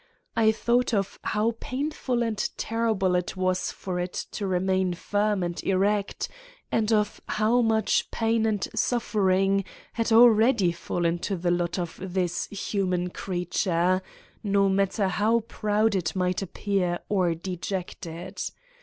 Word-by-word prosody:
I 220 -1 +5
thought 240 +2 +1
of 200 0 -2
how 220 +2 0
painful 260 -3 -2
and 220 -3 -2 0.2
terrible 220 -5 0
it 180 +1 -1
was 185 0 0
for 180 -2 -4
it 180 0 -3 0.2
to 200 - -3
remain 185 0 +1
firm 205 +1 0
and 175 -1 -3
erect 200 +1 0 0.4
and 220 0 +1
of 210 -1 +1
how 220 +3 +2
much 220 -2 +2
pain 225 0 +1
and 210 -3 0
suffering 195 -4 +2 0.3
had 230 0 -1
already 225 -4 +6
fallen 170 0 -1
to 195 +2 -2
the 175 0 0
lot 175 -1 0
of 175 -2 -4
this 180 -2 -1
human 185 -3 -1
creature, 180 0 0 0.4
no 200 -1 +2
matter 195 +1 +1
how 215 +5 +2
proud 215 0 0
it 165 -5 -1
might 180 0 0
appear 190 -1 -1
or 180 -5 +1
dejected. 175 -1 -5
195 Hz, 135 wpm, -26 LUFS, 180-220 Hz, 0.4 s, already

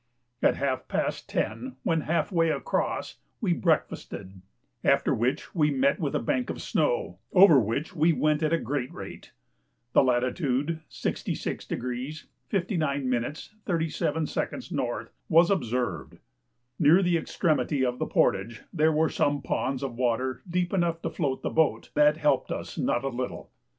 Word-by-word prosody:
At - - +4
half 135 -2 -2
past - - -2
10, 120 +4 -2
when 165 -3 +1
half 170 +7 0
way 165 -2 +3
across, - - -2 0.2
we 195 -8 +1
breakfasted, 100 - -2 0.4
after - - +3
which 130 +6 -1
we 150 -4 +3
met 140 +4 +2
with 150 -5 -1
a - - +2
bank 250 - -1
of - - -4
snow, - - 0
over 180 -7 +8
which 125 - -2
we 165 +1 +4
went 155 0 +1
at 155 0 +1
a 165 - +4
great 130 -2 -3
rate. - - -9 0.6
The - - +7
latitude, 130 +4 0
66° 125 +5 -4 0.2
59' 145 - 0 0.3
37" 160 -3 -1 0.5
N., - - -2 0.2
was 170 +3 +5
observed. 120 - -1 0.6
Near 165 +5 +6
the 175 -1 +3
extremity 150 -4 0
of 125 0 -2
the - - -1
portage 105 +4 +1
there 160 -2 +3
were 160 +1 +3
some 145 0 0
ponds 135 0 -1
of 135 -3 -3
water 125 +1 0
deep 180 +1 0
enough 170 -3 0
to - - -2
float 140 -6 -2
the - - -1
boat, 160 -1 +1
that 150 +1 +4
helped 150 -2 +1
us - - -5
not 120 - 0
a 135 - 0
little. 125 0 -5
150 Hz, 150 wpm, -27 LUFS, 130-165 Hz, 0.6 s, over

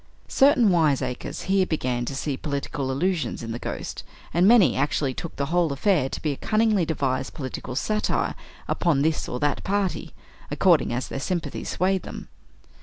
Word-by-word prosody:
Certain 270 -6 +4
wiseacres 150 -7 0
here 190 0 +2
began 125 -6 -1
to 135 - -4
see 140 0 -2
political 140 -1 -3
allusions 170 0 -1
in 115 - -5
the 115 - -4
Ghost, - - -5 0.3
and 175 +3 +4
many 210 - +6
actually 140 -2 0
took 165 +5 -7
the 140 - -1
whole 175 -3 +2
affair 145 -1 +1
to - - -5
be 155 - +1
a 140 - -5
cunningly 215 -4 +2
devised 135 -4 -1
political 130 -2 -5
satire 210 +9 0 0.3
upon 155 -6 +1
this 160 0 0
or 125 - -3
that 145 0 0
party, 200 -1 -2 0.3
according 170 -11 +3
as 120 +2 -2
their - - -5
sympathies 175 +4 -3
swayed 190 +1 +1
them. - - -9
155 Hz, 170 wpm, -25 LUFS, 135-190 Hz, 0.3 s, many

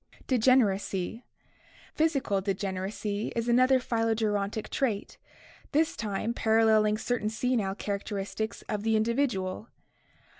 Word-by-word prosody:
Degeneracy. 225 -4 +2 0.3
— - - -26
Physical 275 -11 +1
degeneracy 195 +2 -3
is 230 0 -1
another 255 +2 +5
phylogerontic 220 -3 -1
trait, 225 -7 -2 0.5
this 310 +2 +2
time 215 +2 -2
paralleling 220 -2 +3
certain 225 -1 -1
senile 220 -4 0
characteristics 205 +1 -4
of 210 -2 -3
the 220 +1 +1
in 215 - +3
dividual. 230 -5 -1
220 Hz, 105 wpm, -28 LUFS, 200-240 Hz, 0.5 s, another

